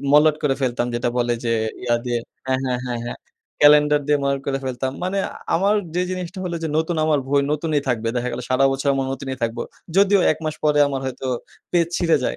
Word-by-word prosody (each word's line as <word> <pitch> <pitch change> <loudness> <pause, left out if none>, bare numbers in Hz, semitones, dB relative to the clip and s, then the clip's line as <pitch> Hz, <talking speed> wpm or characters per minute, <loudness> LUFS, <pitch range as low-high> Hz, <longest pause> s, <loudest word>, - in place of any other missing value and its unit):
মলাট 150 +1 +6
করে 140 -2 +2
ফেলতাম। 120 -2 0
যেটা 120 0 0
বলে 120 0 +1
যে, 115 - +1 0.3
ইয়া 120 -1 +2
দিয়ে 120 -1 0 0.3
হ্যাঁ, 130 0 +1
হ্যাঁ, 125 -1 0
হ্যাঁ, 120 -1 -2
হ্যাঁ। - - -5 0.4
ক্যালেন্ডার 150 0 +6
দিয়ে 145 -1 +3
মলাট 140 0 0
করে 135 -1 0
ফেলতাম। 130 0 -2
মানে 190 +2 -1
আ - - -10 0.2
আমার 200 +5 +3 0.2
যে 180 - +1
জিনিসটা 185 0 -5
হলো 175 -1 -2
যে, 160 - -1
নতুন 160 +1 -1
আমার 155 -2 +3
বই 140 +1 +3
নতুনই 150 -1 0
থাকবে। 115 -2 0
দেখা 125 0 -1
গেল 120 - -4
সারা 130 +1 +4
বছর 135 +1 -1
এমন 135 -1 -1
নতুনই 135 -1 -5
থাকব। 115 0 -1 0.4
যদিও 200 0 +5
১ - - -8
মাস 155 - -1
পরে 150 -1 +3
আমার 135 -1 -2
হয়তো 130 0 -5 0.5
পেজ 170 -2 +3
ছিঁড়ে 170 -2 +3
যায়। - - -1
140 Hz, 220 wpm, -22 LUFS, 125-160 Hz, 0.5 s, মলাট